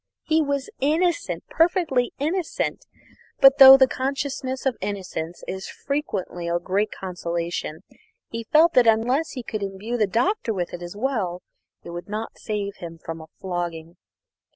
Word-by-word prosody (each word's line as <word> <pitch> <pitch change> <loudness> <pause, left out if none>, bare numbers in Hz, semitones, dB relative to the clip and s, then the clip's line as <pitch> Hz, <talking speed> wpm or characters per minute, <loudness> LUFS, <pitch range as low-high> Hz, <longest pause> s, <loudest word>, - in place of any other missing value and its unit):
He 320 0 +2
was 280 -2 -2
innocent, 330 +5 0
perfectly 330 -7 +2
innocent; 325 +5 -2 0.5
but 270 +2 +7
though 270 0 +12
the 265 -1 +6
consciousness 265 0 -3
of 265 -3 +1
innocence 185 -4 -5
is 190 0 -5
frequently 200 - -3
a 170 0 +1
great 195 +4 0
consolation, 170 -3 -4 0.5
he 230 0 -6
felt 320 +7 +5
that 245 -2 +5
unless 245 +8 +2
he 250 - -5
could 215 -2 -4
imbue 200 +5 -4
the 215 -3 +2
Doctor 235 - 0
with 175 -2 -3
it 175 - -6
as 175 +2 -7
well, 210 -8 -2 0.4
it 170 - -8
would 175 +3 -7
not 215 +2 -5
save 205 -2 -4
him 165 -1 -8
from 165 0 -7
a 160 - -11
flogging. 175 -2 -4
220 Hz, 155 wpm, -24 LUFS, 175-275 Hz, 0.5 s, though